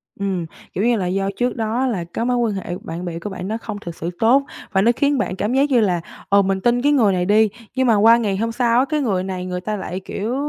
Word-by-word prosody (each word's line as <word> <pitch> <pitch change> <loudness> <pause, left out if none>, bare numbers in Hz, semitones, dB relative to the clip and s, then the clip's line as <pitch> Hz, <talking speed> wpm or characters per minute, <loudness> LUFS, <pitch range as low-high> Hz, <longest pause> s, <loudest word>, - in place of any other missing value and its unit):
Ừm, 190 -4 -2 0.3
kiểu 195 - -1
như 240 0 +3
là, 185 - -1
do 195 +1 0
trước 245 0 0
đó 230 +3 0
là 195 -8 -1
cái 175 +7 -4
mối 250 0 +1
quan 230 -3 +1
hệ 190 -2 -4
bạn 170 +2 -6
bè 170 -1 -4
của 205 - -5
bạn 190 -1 -6
nó 220 +2 -2
không 215 -2 -6
thực 170 -1 -7
sự 170 - -4
tốt 255 +5 +4 0.3
và 190 -1 +2
nó 235 +3 +5
khiến 285 -1 +2
bạn 185 - -1
cảm 210 +5 -1
giác 280 +2 +3
như 250 -3 +4
là, 180 -5 +1 0.3
ờ, 200 0 +5
mình 190 0 -1
tin 240 0 +2
cái 290 +2 +3
người 220 -9 +4
này 180 -1 0
đi, 215 +2 +4 0.3
nhưng 260 -1 +2
mà 225 - +5
qua 225 +3 +6
ngày 205 -4 -1
hôm 230 +2 -1
sau, 240 0 +2
á, 265 - +3
cái 305 -1 0
người 190 -7 0
này 185 -1 -4
người 180 0 -4
ta 215 +2 -3
lại, 185 -1 -5
kiểu, 215 +5 -4
210 Hz, 285 wpm, -20 LUFS, 190-240 Hz, 0.3 s, qua